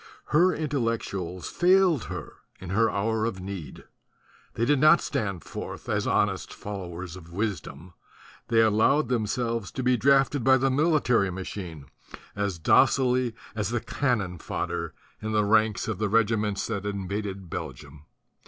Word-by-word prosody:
Her 175 +5 +4
Intellectuals 115 - -2
failed 180 - +3
her - - -7 0.2
in 90 0 -7
her 110 +3 +3
hour 110 +2 0
of 115 -5 -3
need; 95 -4 -7 0.7
they 115 - +1
did 145 +2 +3
not 155 +4 +7
stand 105 - -3
forth - - -7
as - - 0
honest - - 0
followers 90 -3 -6
of 85 -2 -12
wisdom; 90 -4 -4 0.5
they 115 -2 +4
allowed 115 +6 +3
themselves 115 -2 -1
to 130 - -3
be 125 0 +3
drafted 135 +1 +3
by 130 +1 +6
the 135 +1 +1
military 135 - +2
machine 90 -5 -6 0.5
as 100 -3 -2
docilely 125 - +3 0.2
as 105 -3 -2
the 120 0 0
cannon 110 - -1
fodder - - -4 0.3
in 110 0 -3
the 105 -1 +2
ranks 110 0 +2
of 110 -4 -3
the 110 -1 0
regi 115 +1 +3
ments 105 -2 -1
that 100 -4 -3
invaded 100 -1 -4
Belgium. 75 -2 -7
110 Hz, 145 wpm, -26 LUFS, 95-125 Hz, 0.7 s, not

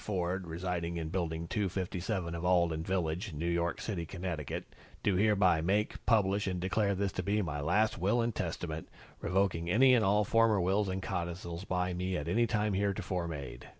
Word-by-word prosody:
Ford, 90 -2 -2
residing 85 0 -3
in 80 -1 -3
Building 85 -2 -2
257 95 -1 -2
of 85 0 -4
Alden 85 -3 +2
Village, 90 +1 -2
New 75 +3 -3
York 85 0 0
City, 95 -6 -3
Connecticut, 85 -4 -4 0.4
do 100 - +3
hereby 95 -4 +4
make, 100 +6 0
publish 100 -3 +3
and 90 -2 -1
declare 100 +2 +1
this 100 +1 -1
to - - -3
be 100 +3 +1
my 75 -4 -3
last 100 +7 +2
Will 100 +7 +2
and 115 0 +1
Testament, 80 -3 -4 0.3
revoking 90 -2 0
any 130 +7 +6
and 120 -3 +4
all 105 +2 +4
former 115 0 +3
wills 95 +3 +1
and 95 0 -3
codicils 85 +1 -4
by 90 -1 -1
me 90 +1 -1
at 75 - -4
any 115 +7 +2
time 105 -2 0
heretofore 95 -3 -1
made." 75 -5 -7
90 Hz, 180 wpm, -32 LUFS, 85-100 Hz, 0.4 s, any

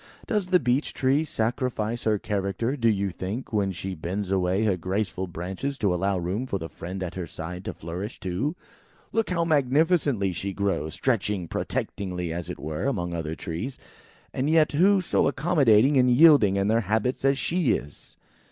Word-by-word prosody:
Does 210 -5 -1
the 180 -1 +4
Beech 125 +2 0
tree 135 +3 +2
sacrifice 120 -3 -2
her 110 -1 +3
character, 100 +6 -2
do 115 -5 +2
you 100 -2 0
think, 95 +9 -5
when 100 -2 +1
she 95 +1 -5
bends 90 +4 -4
away 95 +2 +1
her 100 -3 +2
graceful 95 +1 -2
branches 95 +11 -4
to 100 -7 +1
allow 95 +2 0
room 95 +9 -2
for 100 - -1
the 80 -3 -6
friend 95 +2 -6
at 90 - -5
her 90 -2 -5
side 90 +4 -7
to - - -3
flourish 90 +7 -6
too? 95 - -2 0.6
Look, 225 -1 0
how 170 -2 +1
magnificently 145 - +2
she 95 +3 -4
grows, 95 -6 -1
stretching 105 -7 0
protectingly 90 -1 -3
as 85 -1 -5
it - - -5
were, 75 - -4
among 90 -10 -2
other 80 -1 -3
trees; 90 +13 -5 0.6
and 135 +3 0
yet, 160 -1 +4
who 190 +6 +4
so 180 - +1
accommodating 140 -3 +4
and 125 -1 +5
yielding 125 -7 +6
in 100 0 +1
their 115 +2 +3
habits 110 +6 -1
as 135 0 +3
she 170 -1 +1
is?" 70 0 -7
105 Hz, 180 wpm, -26 LUFS, 90-135 Hz, 0.6 s, yielding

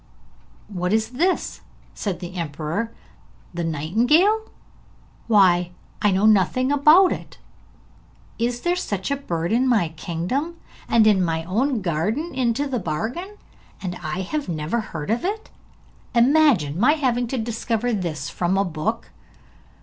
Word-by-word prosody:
'What 180 -1 -2
is 220 0 +1
this?' 345 +9 -1 0.3
said 190 -4 -4
the 175 0 -7
emperor. 165 +6 -3 0.6
'The 175 0 -3
nightingale? 245 - +2 0.8
Why, 180 -5 +4 0.3
I 210 - +4
know 195 +2 +2
nothing 220 +6 +3
about 305 +6 +6
it. - - -6 1.0
Is 240 +1 -1
there 350 0 +1
such 200 - -3
a - - +2
bird 170 -11 -3
in 250 +3 +2
my 220 -10 +2
kingdom, 175 - -3 0.3
and 225 -2 +5
in 205 -4 +4
my 165 -1 -1
own 230 - 0
garden 210 - -1
into 255 +1 0
the 260 -3 -2
bargain, 245 - -4 0.4
and 180 -2 -4
I 170 +3 -3
have 285 +6 -3
never 160 +7 -1
heard 170 -6 -5
of 230 - 0
it? 420 +4 -3 0.6
Imagine 235 - +4
my 255 +7 +5
having 250 -5 0
to 260 - -3
discover 230 +1 -1
this 160 -8 -3
from 175 +5 -1
a 195 - +2
book?' 155 -4 -3
220 Hz, 140 wpm, -22 LUFS, 175-265 Hz, 1.0 s, about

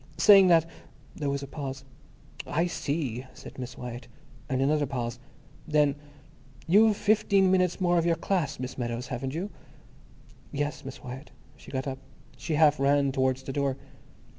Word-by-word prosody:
saying 195 -2 +8
that—" 165 -2 +5 0.5
There 145 -2 -2
was 140 0 -2
a - - -6
pause. 135 -2 -6 0.6
"I 165 +3 +1
see," 140 -7 -3
said - - -11
Miss 125 -1 -7
Wyatt. 120 0 -7 0.4
And 130 -2 0
another 145 +2 +2
pause. 120 -3 -4 0.5
Then—"You've 150 - +1
fifteen 200 -3 +3
minutes 185 -1 +2
more 175 -2 +3
of 165 - 0
your 165 - +3
class, 165 -4 -1
Miss 130 +1 -6
Meadows, 120 0 -3
haven't 130 +2 -4
you?" 190 +5 -4 1.0
"Yes, 145 0 -3
Miss 135 0 -9
Wyatt." 130 +4 -8 0.3
She - - -15
got 130 -1 -3
up. 135 -1 -4 0.4
She 160 - -3
half 150 -1 +4
ran 140 0 +3
towards 130 0 0
the 135 - -5
door. 140 -1 0
145 Hz, 155 wpm, -28 LUFS, 130-165 Hz, 1.0 s, saying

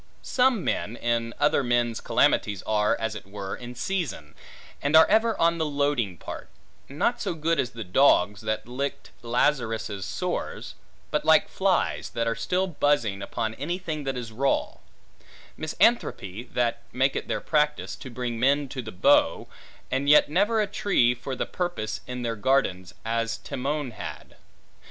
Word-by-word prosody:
Such 260 +1 +3
men, 170 - -2
in 115 -1 -1
other 145 -1 +3
men's 120 -2 0
calamities, 100 -2 +2
are, 105 -1 +1
as 115 -1 -2
it 105 -2 -9
were, 100 -1 -5
in 125 0 -9
season, 140 - -3 0.5
and 140 +2 +1
are 160 0 +9
ever 225 +2 +2
on 170 0 +3
the 160 - +1
loading 140 - 0
part: - - -8 0.4
not - - 0
so - - -2
good 165 +1 0
as 125 - +1
the 115 0 -7
dogs, 105 -1 +3
that 110 +1 -3
licked 140 +3 -4
Lazarus' 115 -5 0
sores; - - -4 0.4
but - - 0
like - - +5
flies, - - 0
that 115 - -2
are 115 - +1
still 180 +9 0
buzzing 145 - +1
upon 110 +2 -3
any 155 +9 -3
thing 160 -5 -4
that 135 -1 -2
is 115 -2 -6
raw; 135 +5 0 0.8
misanthropi, 125 - 0
that 120 -1 0
make 130 +2 +1
it - - -3
their - - -1
practice, 150 -1 0
to 135 - -9
bring 120 -1 -4
men 140 +3 +3
to 130 - -5
the 110 -2 -8
bough, 95 -3 +3 0.4
and 135 +2 0
yet 150 - +7
never 205 +8 +2
a 210 - +3
tree 195 -11 +2
for 125 +2 -6
the - - -2
purpose 175 -12 -3
in 125 0 -5
their 115 -1 -1
gardens, 105 -6 0
as 115 0 -1
Timon 140 0 -3
had. 110 - -8
125 Hz, 165 wpm, -26 LUFS, 115-150 Hz, 0.8 s, are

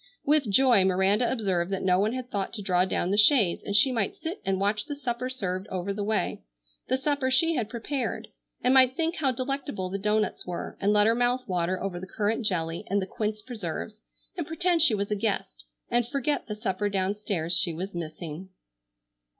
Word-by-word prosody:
With 290 -5 +3
joy 240 -1 +5
Miranda 190 +5 +2
observed 190 -7 0
that 195 - -2
no 185 -1 +3
one 210 +3 +1
had 255 -1 -6
thought 200 -2 -2
to 210 -3 -4
draw 180 -2 +2
down 185 -1 -1
the 205 - +3
shades 210 - +5
and 200 - -3
she 260 +6 +6
might 225 -6 -1
sit 335 +5 -6
and 195 -1 0
watch 210 +2 0
the 290 - -4
supper 255 -2 -3
served 190 -6 -3
over 190 +1 -3
the 205 +1 -3
way,—the - - -3
supper 280 -1 0
she 325 +6 +4
had 240 -8 -2
prepared,—and 250 +1 -3
might 260 -1 +6
think 330 +2 -1
how 275 -4 +2
delectable 255 -7 -3
the 195 - -3
doughnuts 210 +1 0
were, 180 -1 -5
and 200 +1 +3
let 210 0 +4
her 225 - +4
mouth 245 +2 0
water 180 0 -1
over 185 -3 -4
the 190 - -8
currant 215 +3 -1
jelly 165 -3 -2
and 200 +2 +2
the 190 - -2
quince 215 +1 -3
preserves 215 -2 -6 0.3
and 340 -5 -4
pretend 335 +1 +1
she 260 -8 +6
was 200 0 -3
a - - +2
guest, 195 - -3 0.3
and 240 -1 +2
forget 280 +2 -1
the 210 - -4
supper 205 0 -2
downstairs 195 -3 -1
she 175 0 +2
was 185 +5 -5
missing. 170 +1 -6
210 Hz, 200 wpm, -27 LUFS, 185-255 Hz, 0.3 s, she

